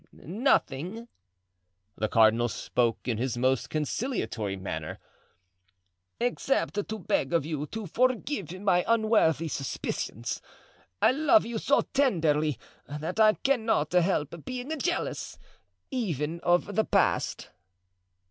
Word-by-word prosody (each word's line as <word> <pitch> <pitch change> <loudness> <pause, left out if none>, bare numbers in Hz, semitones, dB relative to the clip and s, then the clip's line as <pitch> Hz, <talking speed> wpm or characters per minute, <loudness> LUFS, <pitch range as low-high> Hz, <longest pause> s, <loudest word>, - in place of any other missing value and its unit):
"Nothing,"—the 105 - -3
cardinal 115 +2 +4
spoke 115 +1 -1
in 115 -3 -1
his 125 -1 -1
most 130 +1 +1
conciliatory 150 - -2
manner—"except 90 - -5
to 220 - -3
beg 160 -7 -1
of 165 -4 +2
you 150 -2 -3
to 220 +4 -6
forgive 250 - 0
my 180 -3 +3
unworthy 215 -9 +3
suspicions. 120 -4 -4 0.6
I - - +7
love 310 +4 +4
you 230 -1 -3
so 285 - +3
tenderly 155 - +1 0.3
that 155 +7 -4
I 215 -1 +7
cannot 220 - 0
help 170 -3 +1
being 255 +5 -4
jealous, 350 +4 -2 0.5
even 170 - -2
of 175 +4 +1
the 220 +3 +2
past." - - +1
160 Hz, 105 wpm, -28 LUFS, -, 0.6 s, I